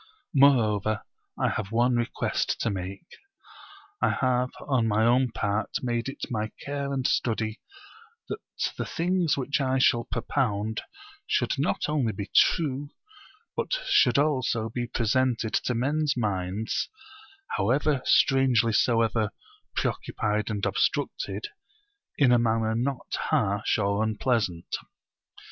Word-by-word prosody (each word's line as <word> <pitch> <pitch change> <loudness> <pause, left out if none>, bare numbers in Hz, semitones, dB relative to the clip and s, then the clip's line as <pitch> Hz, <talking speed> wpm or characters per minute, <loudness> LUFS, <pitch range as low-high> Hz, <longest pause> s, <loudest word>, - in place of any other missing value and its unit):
Moreover 110 - +3 0.3
I - - +1
have 100 -2 -3
one 120 +2 +3
request 120 0 -1
to 115 - 0
make. 95 - -5 1.0
I - - +4
have 125 -1 +1
on 130 -5 +1
my 110 +1 +2
own 125 +2 +4
part 105 -1 -1
made 120 0 -1
it 135 - -9
my 110 -2 -1 0.2
care 140 0 -3
and 135 -2 -2
study 110 -3 0 0.7
that - - -4 0.4
the - - -1
things 175 -3 +1
which 140 +2 0
I 130 0 +1
shall 120 -2 +3
propound 110 -3 -1 0.5
should - - +1
not 150 - 0
only 140 -7 0
be 100 +1 -6
true, 145 -3 +3 0.7
but - - -2
should 125 - +4
also 130 -6 +1
be 120 +1 -3
presented 115 0 0
to 125 - 0
men's 145 +3 0
minds, 100 -1 -1 0.6
how 100 - 0 0.3
strangely 130 -4 +4
soever 115 -2 +2 0.5
preoccupied 105 0 -1
and 105 -2 -2
obstructed, 425 -4 -1 0.7
in 135 -4 +5
a 120 - +5
manner 115 -1 +1
not 125 +3 -2 0.2
harsh 100 +2 +1
or 100 0 +1
unpleasant. 110 -5 0
120 Hz, 120 wpm, -27 LUFS, 110-135 Hz, 1.0 s, in